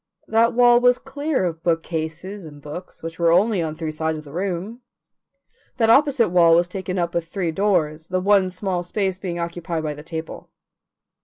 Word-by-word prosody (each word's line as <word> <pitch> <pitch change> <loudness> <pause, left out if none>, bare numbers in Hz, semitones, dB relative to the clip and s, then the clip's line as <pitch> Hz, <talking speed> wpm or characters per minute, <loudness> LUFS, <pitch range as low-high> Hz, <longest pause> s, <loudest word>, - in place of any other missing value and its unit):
That 230 +1 +3
wall 240 0 +6
was 245 0 +4
clear 285 -1 -2
of 165 -2 -3
bookcases 165 +3 -3
and 150 -2 -11
books, 150 +6 -9
which 165 +1 -7
were 170 -1 +4
only 200 +2 +3
on 155 -1 -3
three 160 -1 -4
sides 160 0 -2
of 155 - -8
the 145 -1 -13
room. 195 +6 -3 1.0
That 225 -2 +4
opposite 270 -4 +4
wall 170 -2 +5
was 175 +1 +3
taken 185 0 -4
up 170 -1 -1
with 170 -1 -2
three 175 -2 -2
doors, 160 -4 0
the 185 0 -1
one 195 0 +3
small 185 0 -2
space 190 +1 -2
being 175 -3 -4
occupied 170 -1 -3
by 150 -1 -2
the 145 - -10
table. 160 0 -7
175 Hz, 185 wpm, -22 LUFS, 165-205 Hz, 1.0 s, wall